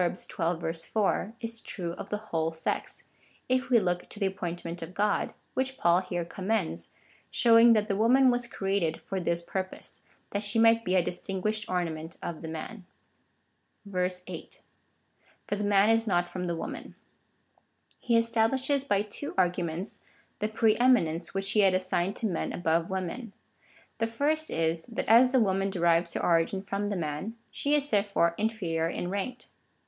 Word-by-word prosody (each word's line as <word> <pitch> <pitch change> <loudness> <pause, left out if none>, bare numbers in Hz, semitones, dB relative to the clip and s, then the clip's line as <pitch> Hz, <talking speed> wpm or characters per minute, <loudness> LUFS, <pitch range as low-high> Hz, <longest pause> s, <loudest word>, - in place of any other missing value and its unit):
xii. 180 0 -2
4,) 170 +5 -1
is 230 -1 -5
true 175 -4 -5
of 185 +3 -8
the 210 - -1
whole 165 -7 -2
sex, 160 0 -4 0.4
if 255 0 +1
we 245 - +6
look 180 -3 -1
to 210 - -8
the 195 -2 +2
api^ointment 175 -2 -5
of 165 +3 -8
God, 205 0 +1 0.2
which 265 0 -2
Paul 170 +1 +4
here 175 -2 -3
commends, 185 - -2 0.4
showing 230 0 +6
that 215 -1 +2
the 200 - 0
woman 250 +5 +5
was 245 -1 -1
created 195 -7 -1
for 195 - -3
this 170 -1 -1
pur]30se 185 +1 -5 0.2
— - - -39
that 200 - -1
she 205 +1 -1
might 230 0 +5
be 185 -2 0
a 180 - +4
distinguished 195 +5 -3
ornament 165 -3 -3
of 170 -2 -5
the 160 - -6
man. 160 +6 -6 1.4
8. - - -9 0.8
For - - -1
the 205 - -3
man 205 +1 +4
is 225 0 +2
not 175 -3 +2
from 180 0 -4
the 170 - -1
woman. 165 - -6 1.0
He 235 -1 +2
establishes 235 +5 +1
by 205 -6 +1
two 215 +8 -7
arguments 180 0 -1 0.4
the 215 - 0
pre 220 0 +3
eminence, 200 -10 +2
which 195 0 -1
he 215 - +2
had 190 -2 +5
assigned 185 +1 0
to 230 - -4
men 180 -6 -1
above 165 -1 0
women. 190 +4 -4 0.7
The 225 - +1
first 300 +7 0
is, 165 0 0
that 230 - -4
as 245 +3 +7
the 260 - +4
woman 195 -2 +1
derives 170 -2 +2
her - - -2
origin 170 +3 +2
from 200 +1 -2
the 205 - -1
man, 160 +7 -3 0.2
she 290 +1 +1
is 290 -1 +1
therefore 200 -5 +2
inferior 185 -7 0
in 175 +1 -3
rank. 245 +6 -3
195 Hz, 170 wpm, -29 LUFS, 175-225 Hz, 1.4 s, as